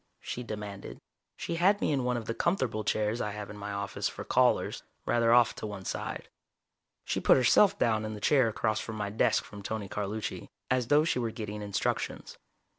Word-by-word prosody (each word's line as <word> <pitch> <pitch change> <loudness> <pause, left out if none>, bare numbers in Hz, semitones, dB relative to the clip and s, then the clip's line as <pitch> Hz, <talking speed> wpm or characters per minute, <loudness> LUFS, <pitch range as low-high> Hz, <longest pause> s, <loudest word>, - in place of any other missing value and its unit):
she 125 - -5
demanded. 105 -4 -7 0.4
She 165 - -3
had 195 +4 +4
me - - +1
in 135 -3 +1
one 125 0 0
of 115 - -5
the 115 - -2
comfortable 130 - 0
chairs 105 +2 0
I 105 - -1
have 105 0 -6
in - - -9
my 105 0 -5
office 100 -1 -2
for - - -7
callers, - - +2 0.2
rather 115 -1 +3
off 120 -1 +5
to - - -4
one 100 -2 -7
side. - - -4 0.8
She - - -1
put - - +5
herself 195 +11 +5
down 110 - +2
in 110 0 -4
the - - -7
chair 130 +3 +4
across 110 0 -1
my 105 -2 -3
desk 110 - +2
from 100 0 -10
Tony 105 0 -4
Carlucci, 105 +2 -4 0.2
as 125 -2 +2
though 145 +3 +5
she 160 - 0
were 115 -2 -1
getting 105 -1 -6
instructions. 100 -2 -3
110 Hz, 195 wpm, -30 LUFS, 105-125 Hz, 0.8 s, off